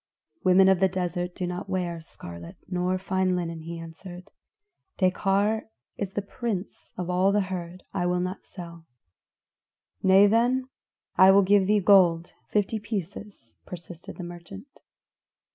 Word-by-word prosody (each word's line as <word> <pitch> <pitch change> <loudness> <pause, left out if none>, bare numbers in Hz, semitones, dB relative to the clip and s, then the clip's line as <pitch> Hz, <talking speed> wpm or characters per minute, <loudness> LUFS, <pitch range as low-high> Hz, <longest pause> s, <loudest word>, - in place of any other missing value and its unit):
"Women 185 0 +6
of 190 -2 +4
the 190 - +4
desert 180 -1 -3
do 185 - -3
not 180 +2 -5
wear 175 -3 -2
scarlet 85 - -10
nor 180 0 0
fine 190 -1 0
linen," 170 -2 -3
he 165 +1 -7
answered. 175 +2 -10 0.7
"Dekar 200 - +1 0.3
is 195 -2 -4
the 205 - -2
prince 200 -2 -5
of 180 - -3
all 180 +2 +2
the 205 - +2
herd; 185 -1 -6
I 180 -2 0
will 180 0 +1
not 185 +2 -4
sell." 170 -3 -11 1.1
"Nay 190 +1 +6
then, 245 +5 +2 0.5
I 190 - +8
will 195 +1 +6
give 195 0 +4
thee 210 0 +3
gold 180 -3 +4 0.2
fifty 210 +1 0
pieces," 205 - -7
persisted 175 -1 -9
the 180 - -6
merchant. 175 +9 -11
185 Hz, 145 wpm, -26 LUFS, 175-195 Hz, 1.1 s, I